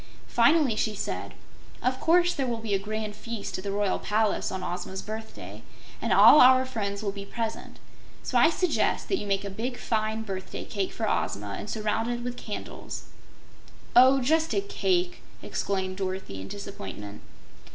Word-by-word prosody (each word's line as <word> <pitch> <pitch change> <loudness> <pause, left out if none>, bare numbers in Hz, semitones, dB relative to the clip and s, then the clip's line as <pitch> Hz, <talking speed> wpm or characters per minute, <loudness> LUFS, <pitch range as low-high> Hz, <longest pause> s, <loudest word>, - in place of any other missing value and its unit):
Finally 265 0 +4
she 215 0 0
said: - - -4 0.5
"Of 255 +1 +1
course 350 +2 +4
there 270 -2 -1
will 235 -1 -1
be 225 -2 -3
a 195 - +2
grand 215 +1 -4
feast 225 0 -5
at - - -8
the 200 - -3
Royal 200 -1 0
Palace 215 0 0
on 190 -1 -4
Ozma's 180 +2 -4
birthday, 220 +1 -8 0.4
and - - -1
all 300 - +9
our 255 +1 +7
friends 205 -5 -3
will 200 - 0
be 200 0 -7
present. 225 +2 -5 0.5
So - - -5
I 320 - +7
suggest 360 0 0
that 385 - +2
you 205 - -5
make 195 0 0
a 225 +6 -4
fine 220 -1 -1
big - - -7
birthday 190 -2 -5
cake 200 0 -3
of - - -5
Ozma, 105 - -1
and 210 - -6
surround 220 +1 -1
it 240 0 -2
with 245 0 -3
candles." 210 -4 -7 0.9
"Oh, 260 +2 +7
just 320 +5 +2
a 395 - +2
CAKE!" 185 - 0 0.2
exclaimed 190 -1 -2
Dorothy, 185 - -4
in 95 - -7
disappointment. 105 - -8
215 Hz, 170 wpm, -27 LUFS, 195-245 Hz, 0.9 s, all